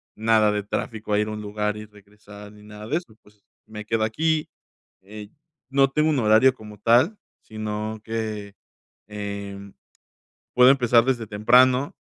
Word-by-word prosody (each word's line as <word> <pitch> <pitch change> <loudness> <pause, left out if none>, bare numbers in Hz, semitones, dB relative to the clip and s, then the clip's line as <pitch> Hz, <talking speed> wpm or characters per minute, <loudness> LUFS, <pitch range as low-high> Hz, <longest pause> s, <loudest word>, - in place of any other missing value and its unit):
nada 110 -1 +2
de 105 0 -2
tráfico 105 +1 -4
a 105 - +3
ir 105 - 0
a - - -5
un 105 0 -6
lugar 105 0 -3
y 105 - -8
regresar, 105 0 -15
ni 105 0 -17
nada 105 0 -11
de 150 - 0
eso, 170 -11 -10
pues, 105 -1 -25 0.2
me 105 -1 -9
quedo 110 0 -1
aquí, 155 +8 0 0.5
eh, 105 +2 -11 0.4
no 135 0 +3
tengo 150 +3 +1
un 150 -3 +1
horario 110 +3 +4
como 105 -4 -13
tal, 120 - +3 0.2
sino 110 0 -5
que, 110 -3 -5 0.5
em, 100 -1 -7 0.8
puedo 125 +1 +7
empezar 120 -3 +4
desde 120 -3 -1
temprano 125 +6 +3
110 Hz, 160 wpm, -23 LUFS, 105-120 Hz, 0.8 s, puedo